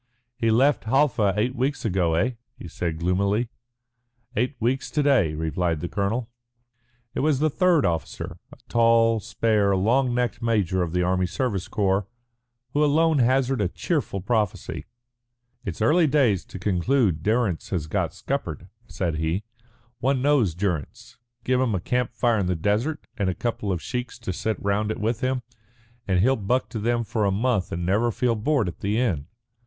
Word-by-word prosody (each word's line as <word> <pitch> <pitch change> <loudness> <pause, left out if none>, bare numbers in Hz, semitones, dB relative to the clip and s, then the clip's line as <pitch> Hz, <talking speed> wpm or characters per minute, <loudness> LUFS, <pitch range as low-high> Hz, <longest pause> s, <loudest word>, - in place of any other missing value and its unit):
"He 115 -1 0
left 130 +5 +3
Halfa 115 -6 +2
eight 120 +5 +1
weeks 135 +2 -1
ago, 90 -5 +1
eh?" 110 +10 +2 0.3
he - - -9
said 85 0 -3
gloomily. 100 +7 +1 0.9
"Eight 125 +6 0
weeks 125 +4 0
to 150 - 0
day," 120 - +3
replied 80 +1 -1
the 85 - -3
colonel. 105 +6 -1 0.9
It - - -3
was 150 -1 +2
the 155 +2 +1
third 180 -2 +3
officer, 85 -2 -3
a - - -13
tall, 115 -1 +4
spare, 105 -3 +1
long 120 +6 +2
necked 125 -1 -1
major 100 -6 +1
of 85 -2 -2
the 90 0 +2
Army 90 0 +1
Service 100 0 -2
Corps, 100 -1 0 0.7
who 150 - +3
alone 155 +1 +3
hazarded 130 -4 +2
a - - -23
cheerful 145 - -2
prophecy. 105 -1 -1 0.8
"It's 95 +2 -3
early 160 +7 +4
days 130 - +2
to - - -9
conclude 95 - +1
Durrance 105 -3 0
has 85 -6 -2
got 75 - -1
scuppered," 90 - -4 0.2
said 85 -5 -2
he. 80 +6 -1 0.6
"One 135 +1 +1
knows 130 - +2
Durrance. 90 -7 -4 0.2
Give 130 0 +2
him 120 -5 +1
a - - 0
camp 125 +5 -1
fire 120 -2 +2
in 95 - 0
the 90 - +1
desert, 110 - -1
and 100 -3 0
a 90 - -2
couple 115 -4 -2
of 90 -3 -2
sheiks 125 +1 -4
to 115 -6 -4
sit 110 +4 -2
round 100 +1 0
it 110 - -3
with 115 +3 -1
him, 130 -1 0 0.6
and 95 -2 +2
he'll 130 +6 +4
buck 125 +6 0
to 110 - -4
them 120 +2 0
for 110 0 -1
a 100 - +2
month 105 -1 0
and 85 +1 -3
never 105 +6 +2
feel 120 +2 +1
bored 125 0 +1
at 85 - -6
the 105 +2 -1
end. 90 - 0
110 Hz, 175 wpm, -24 LUFS, 95-125 Hz, 0.9 s, tall